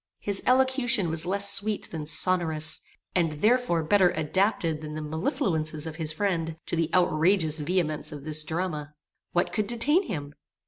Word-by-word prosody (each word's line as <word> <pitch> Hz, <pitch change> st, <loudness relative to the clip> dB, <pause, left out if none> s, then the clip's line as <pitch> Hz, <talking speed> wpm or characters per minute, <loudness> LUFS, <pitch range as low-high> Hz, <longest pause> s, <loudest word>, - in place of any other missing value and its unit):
His 200 Hz, -1 st, 0 dB
elocution 255 Hz, -, +2 dB
was 165 Hz, +1 st, +1 dB
less 200 Hz, +1 st, +2 dB
sweet 205 Hz, +1 st, 0 dB
than 155 Hz, -3 st, -5 dB
sonorous; 160 Hz, -2 st, +3 dB, 0.3 s
and, 165 Hz, -4 st, +1 dB
therefore, 210 Hz, 0 st, +1 dB
better 185 Hz, +3 st, +4 dB
adapted 160 Hz, 0 st, 0 dB
than 150 Hz, -1 st, -7 dB
the -, -, -4 dB
mellifluences 160 Hz, -, -2 dB
of 160 Hz, -1 st, -7 dB
his 160 Hz, -2 st, -2 dB
friend, 165 Hz, -3 st, -2 dB
to -, -, -2 dB
the 165 Hz, -1 st, 0 dB
outrageous 165 Hz, -2 st, +2 dB
vehemence 155 Hz, -1 st, -1 dB
of 145 Hz, -2 st, -9 dB
this 155 Hz, 0 st, +1 dB
drama. 155 Hz, -2 st, -4 dB, 0.4 s
What 175 Hz, +1 st, 0 dB
could 215 Hz, -2 st, -1 dB
detain 295 Hz, -, +2 dB
him? 145 Hz, -6 st, -5 dB
165 Hz, 155 wpm, -26 LUFS, 155-200 Hz, 0.4 s, better